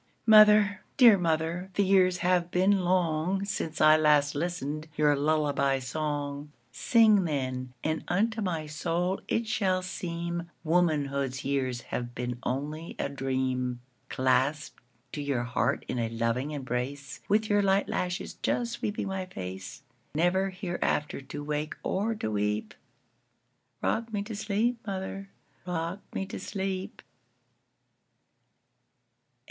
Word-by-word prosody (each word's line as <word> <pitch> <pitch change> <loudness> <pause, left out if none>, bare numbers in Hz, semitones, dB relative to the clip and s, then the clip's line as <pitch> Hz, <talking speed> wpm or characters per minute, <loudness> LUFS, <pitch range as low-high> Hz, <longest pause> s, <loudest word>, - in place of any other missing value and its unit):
Mother, 210 -2 +7 0.2
dear 240 -5 +9
mother, 165 +2 -1
the 200 - +3
years 185 -2 +4
have 180 -1 +2
been 190 +3 +3
longSince 180 0 0
I 155 0 +7
last 150 -2 +4
listened 155 -1 -3
your 150 -1 +4
lullaby 145 -2 +1
song:Sing, 145 - +1
then, 130 -4 -3
and 155 0 -1
unto 220 +5 +1
my 170 -6 -2
soul 170 +4 -1
it 230 - 0
shall 185 -4 +1
seemWomanhood's 170 -6 -1
years 130 -3 -1
have 120 0 -5
been 125 0 -3
only 150 +5 -4
a - - -2
dream. 130 -2 -1 0.3
Clasped 130 +3 0 0.3
to 145 - -4
your 140 -4 -1
heart 125 0 0
in 125 - -2
a 115 -1 0
loving 115 +4 -1
embrace, 135 0 -4
With 215 +2 +2
your 205 -1 +3
light 195 0 +2
lashes 180 0 -2
just 235 -1 0
sweeping 210 -2 -3
my 190 -1 -3
face, 95 - -7 0.3
Never 180 +4 +2
hereafter 175 -6 -2
to 145 +2 -7
wake 150 +1 -3
or 220 +4 0
to 110 - -3
weep;—Rock 105 - -5
me 205 -2 -1
to 220 +1 -6
sleep, 220 +3 0
mother,—rock 190 -2 -5 0.2
me 195 - -1
to - - -7
sleep! 195 +1 -4
160 Hz, 120 wpm, -28 LUFS, 140-190 Hz, 0.3 s, dear